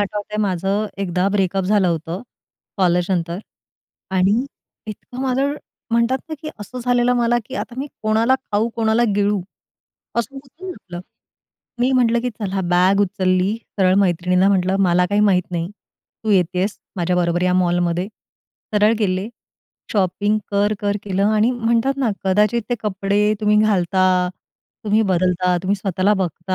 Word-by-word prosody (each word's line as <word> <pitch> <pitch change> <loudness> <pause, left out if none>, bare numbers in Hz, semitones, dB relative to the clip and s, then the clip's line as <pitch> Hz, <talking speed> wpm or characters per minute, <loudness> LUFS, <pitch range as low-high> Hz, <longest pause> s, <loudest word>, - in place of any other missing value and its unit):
आठवतंय 210 +1 -3
माझं 195 +2 0 0.2
एकदा 185 0 0
ब्रेकअप 195 -1 0
झालं 200 -1 +3
होतं 165 +2 -3 0.5
कॉलेज 180 -2 +2
नंतर 170 -1 -1 0.8
आणि 200 +7 +3 0.4
इतकं 230 +4 -8
माझं 270 +2 +1 0.4
म्हणतात 235 +3 +2
ना, 315 - -4
की 310 - -5
असं 250 +5 -7
झालेलं 245 0 +3
मला, 240 0 +2
की - - -8
आता 240 - -5
मी 275 - -2 0.2
कोणाला 220 +4 +3
खाऊ 215 0 0
कोणाला 225 0 +2
गिळू. 205 0 +1 0.8
असं 235 +4 -1
होतं 275 +7 -11
ना 370 - -4
आपलं. 175 -2 -9 0.8
मी 250 +2 +3
म्हटलं, 235 -2 +3
की 250 +1 -2
चला 200 -4 -3
बॅग 185 +3 +4
उचलली 185 0 +1 0.2
सरळ 185 -1 +4
मैत्रिणीला 180 0 +2
म्हटलं, 190 -1 +2
"मला 180 -1 +3
काही 205 +3 +1
माहीत 195 -3 +4
नाही, 170 -1 -2 0.6
तू 220 - 0
येते 180 -2 +2
आहेस 195 +3 -1 0.2
माझ्याबरोबर 175 -1 0
या 180 0 +2
मॉलमध्ये." 175 0 +1 0.7
सरळ 210 +1 +4
गेले. 190 -1 0 0.6
शॉपिंग 205 +1 +1
कर-कर 205 0 0
केलं 195 0 0
आणि 215 +2 +3
म्हणतात 235 +2 +1
ना, 245 -5 +1
कदाचित 210 +4 +2
ते 245 - +3
कपडे 205 +1 +1
तुम्ही 210 0 +3
घालता, 190 -3 +2 0.8
तुम्ही 215 +1 +3
बदलता, 180 0 +1
तुम्ही 195 +2 +1
स्वतःला 195 +1 +1
बघता 185 0 -2
200 Hz, 145 wpm, -20 LUFS, 185-220 Hz, 0.8 s, बॅग